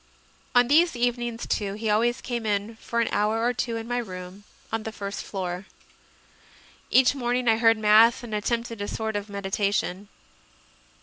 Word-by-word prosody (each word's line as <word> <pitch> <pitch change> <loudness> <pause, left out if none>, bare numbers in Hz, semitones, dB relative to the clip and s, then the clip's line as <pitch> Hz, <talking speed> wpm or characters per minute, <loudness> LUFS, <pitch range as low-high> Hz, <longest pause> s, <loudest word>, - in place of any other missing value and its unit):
On 245 0 +6
these 325 +3 +4
evenings, 240 -1 -1
too, 200 -2 -1
he 220 +1 -4
always 235 +3 +1
came 240 -2 -3
in 205 +2 -1
for 235 +1 -2
an 230 - 0
hour 215 +2 +1
or 245 - +2
two 240 -1 -2
in 225 0 -6
my 245 0 -1
room, 185 -2 -8 0.3
on 225 - -1
the 220 - -5
first 200 -2 -5
floor. 185 -1 -5 1.2
Each 260 +1 +5
morning 245 -2 -1
I 225 -1 +5
heard 225 -1 +4
Mass 220 +3 +5
and 230 -2 -7
attempted 230 +1 -2
a 205 - -3
sort 220 0 -3
of 205 +1 -3
med 200 0 -6
itation. 195 0 -1
225 Hz, 175 wpm, -25 LUFS, 205-240 Hz, 1.2 s, On